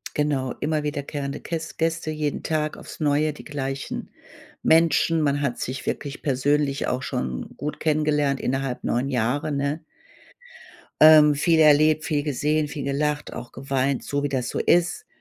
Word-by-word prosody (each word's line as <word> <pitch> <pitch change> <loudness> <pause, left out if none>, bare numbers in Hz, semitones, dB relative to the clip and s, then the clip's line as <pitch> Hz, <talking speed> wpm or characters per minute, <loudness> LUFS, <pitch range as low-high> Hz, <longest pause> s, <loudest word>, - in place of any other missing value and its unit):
Genau, 140 -4 0
immer 150 0 -1
wiederkehrende 145 -1 -4
Käss 160 -2 -5
Gäste 165 -1 -1
jeden 150 -2 -3
Tag 155 -1 -1
aufs - - -11
Neue, 150 0 +2
die 150 - -12
gleichen 135 -2 -4 0.5
Menschen. 165 0 +3
Man 145 -1 +1
hat 130 -4 -1
sich 130 +2 -4
wirklich 145 -1 -4
persönlich 140 +1 0
auch 125 +1 -1
schon 65 - -4
gut 150 +2 -5
kennengelernt 150 -3 +1
innerhalb 135 -1 -2
9 125 +3 0
Jahre, 130 +4 -1
ne? 140 +3 -1 1.2
Ähm, 155 -1 +8
viel 160 +3 +2
erlebt, 155 +1 +5
viel 150 -3 0
gesehen, 150 +1 0
viel 145 -1 -6
gelacht, 145 +2 -1
auch 120 - -8
geweint, 135 0 -1
so 145 0 -2
wie 145 - -1
das 125 -4 -2
so - - -3
ist. 175 - +1
145 Hz, 155 wpm, -24 LUFS, 135-155 Hz, 1.2 s, Ähm